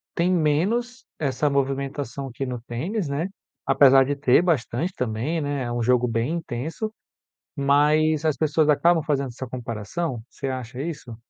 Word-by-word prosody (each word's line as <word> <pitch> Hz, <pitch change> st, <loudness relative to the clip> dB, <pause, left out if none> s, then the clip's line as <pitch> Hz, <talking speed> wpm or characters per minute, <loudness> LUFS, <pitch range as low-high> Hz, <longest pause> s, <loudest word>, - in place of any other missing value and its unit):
tem 175 Hz, +2 st, +2 dB
menos 200 Hz, -, 0 dB
essa 145 Hz, 0 st, 0 dB
movimentação 140 Hz, 0 st, -2 dB
aqui 135 Hz, +2 st, -5 dB
no 125 Hz, -2 st, -5 dB
tênis, 165 Hz, -, -3 dB
né, 150 Hz, +6 st, -1 dB, 0.4 s
apesar 135 Hz, -1 st, +6 dB
de 145 Hz, +1 st, -1 dB
ter 135 Hz, 0 st, +4 dB
bastante 170 Hz, 0 st, 0 dB
também, 125 Hz, +7 st, -2 dB
né, 145 Hz, -2 st, -2 dB
é 120 Hz, -, -3 dB
um 120 Hz, 0 st, -1 dB
jogo 125 Hz, +1 st, +3 dB
bem 115 Hz, +6 st, -1 dB
intenso, 165 Hz, -, -4 dB, 0.6 s
mas 150 Hz, +2 st, +3 dB
as 155 Hz, -2 st, +2 dB
pessoas 155 Hz, +1 st, +2 dB
acabam 165 Hz, +2 st, +4 dB
fazendo 140 Hz, -3 st, 0 dB
essa 130 Hz, +2 st, -7 dB
comparação? 120 Hz, +3 st, -4 dB
Você 135 Hz, -, -6 dB
acha 130 Hz, -1 st, -4 dB
isso? 145 Hz, -8 st, -6 dB
140 Hz, 155 wpm, -24 LUFS, 125-160 Hz, 0.6 s, apesar